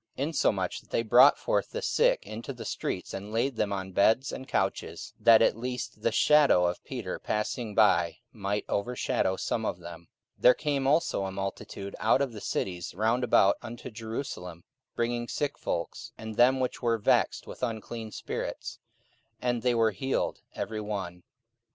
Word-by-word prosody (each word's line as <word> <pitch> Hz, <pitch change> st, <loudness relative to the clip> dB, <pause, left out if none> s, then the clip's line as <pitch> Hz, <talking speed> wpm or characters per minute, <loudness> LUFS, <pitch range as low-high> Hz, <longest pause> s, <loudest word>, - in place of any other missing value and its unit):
44:005:015 135 Hz, -, -1 dB
Insomuch 95 Hz, -, 0 dB
that -, -, -27 dB
they 115 Hz, -, 0 dB
brought 110 Hz, -, +7 dB
forth -, -, 0 dB
the -, -, -4 dB
sick -, -, +2 dB
into 110 Hz, +6 st, -6 dB
the 115 Hz, -3 st, -9 dB
streets, 90 Hz, -, -4 dB
and 100 Hz, +2 st, -6 dB
laid 120 Hz, +4 st, 0 dB
them 105 Hz, -2 st, 0 dB
on 95 Hz, -1 st, -3 dB
beds 110 Hz, +8 st, +3 dB
and 130 Hz, -, -7 dB
couches, -, -, -2 dB
that 115 Hz, -1 st, +7 dB
at -, -, +4 dB
the 115 Hz, -, -14 dB
least 120 Hz, -3 st, -5 dB
the 115 Hz, -, +1 dB
shadow 140 Hz, -6 st, +5 dB
of 85 Hz, 0 st, -2 dB
Peter 120 Hz, -9 st, -5 dB
passing 105 Hz, 0 st, -2 dB
by 85 Hz, -6 st, +4 dB, 0.2 s
might 105 Hz, -1 st, -2 dB
overshadow 100 Hz, -3 st, 0 dB
some -, -, -2 dB
of -, -, -2 dB
them. 85 Hz, -1 st, -10 dB, 0.3 s
44:005:016 -, -, -27 dB
There 125 Hz, -, +8 dB
came 140 Hz, -3 st, -1 dB
also 150 Hz, -8 st, +2 dB
a 95 Hz, -, -4 dB
multitude 95 Hz, 0 st, -5 dB
out -, -, +3 dB
of 130 Hz, -4 st, -4 dB
the 105 Hz, -, -8 dB
cities 90 Hz, -2 st, -3 dB
round 115 Hz, +5 st, +1 dB
about 100 Hz, -4 st, +4 dB
unto 120 Hz, +1 st, -8 dB
Jerusalem, 110 Hz, -6 st, -6 dB, 0.3 s
bringing 120 Hz, 0 st, -1 dB
sick 145 Hz, +2 st, -2 dB
folks, 85 Hz, -1 st, -4 dB
and 110 Hz, 0 st, -6 dB
them 125 Hz, +4 st, +4 dB
which 130 Hz, -1 st, -2 dB
were 115 Hz, -2 st, +2 dB
vexed 105 Hz, -, +2 dB
with -, -, -10 dB
unclean 115 Hz, -1 st, -4 dB
spirits: -, -, -5 dB, 0.6 s
and 120 Hz, -1 st, 0 dB
they 125 Hz, 0 st, +2 dB
were 115 Hz, -1 st, +3 dB
healed 130 Hz, +7 st, -2 dB, 0.2 s
every 110 Hz, 0 st, -3 dB
one. 95 Hz, -4 st, -5 dB
110 Hz, 175 wpm, -28 LUFS, 100-125 Hz, 0.6 s, There